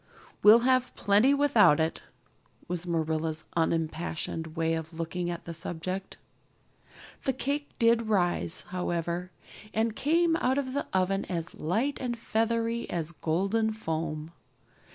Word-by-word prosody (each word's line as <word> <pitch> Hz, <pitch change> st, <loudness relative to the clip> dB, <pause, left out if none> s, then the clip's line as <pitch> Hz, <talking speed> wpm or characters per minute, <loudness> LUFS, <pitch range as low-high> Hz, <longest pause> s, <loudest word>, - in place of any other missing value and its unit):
"We'll 220 Hz, +3 st, +8 dB
have 255 Hz, 0 st, +2 dB
plenty 205 Hz, +7 st, +4 dB
without 280 Hz, -, +5 dB
it" 160 Hz, +1 st, 0 dB, 0.7 s
was 180 Hz, 0 st, -3 dB
Marilla's 160 Hz, -1 st, -1 dB
unimpassioned 160 Hz, 0 st, -1 dB
way 165 Hz, 0 st, +1 dB
of 160 Hz, 0 st, -4 dB
looking 175 Hz, +2 st, -3 dB
at 170 Hz, -1 st, -5 dB
the 170 Hz, -, -5 dB
subject. 175 Hz, +3 st, -5 dB, 1.1 s
The 265 Hz, -, +2 dB
cake 285 Hz, +3 st, -2 dB
did 230 Hz, -1 st, +3 dB
rise, 175 Hz, -4 st, +1 dB
however, 175 Hz, 0 st, -2 dB, 0.5 s
and 220 Hz, 0 st, +1 dB
came 330 Hz, +3 st, +2 dB
out 260 Hz, -2 st, +1 dB
of 260 Hz, -2 st, -2 dB
the 285 Hz, -, -2 dB
oven 190 Hz, +1 st, +1 dB
as 165 Hz, -3 st, -4 dB
light 225 Hz, -, -1 dB
and 240 Hz, -2 st, -2 dB
feathery 230 Hz, +1 st, -1 dB
as 170 Hz, -2 st, -2 dB
golden 195 Hz, +8 st, 0 dB
foam. 160 Hz, -5 st, -3 dB
185 Hz, 130 wpm, -29 LUFS, 165-230 Hz, 1.1 s, We'll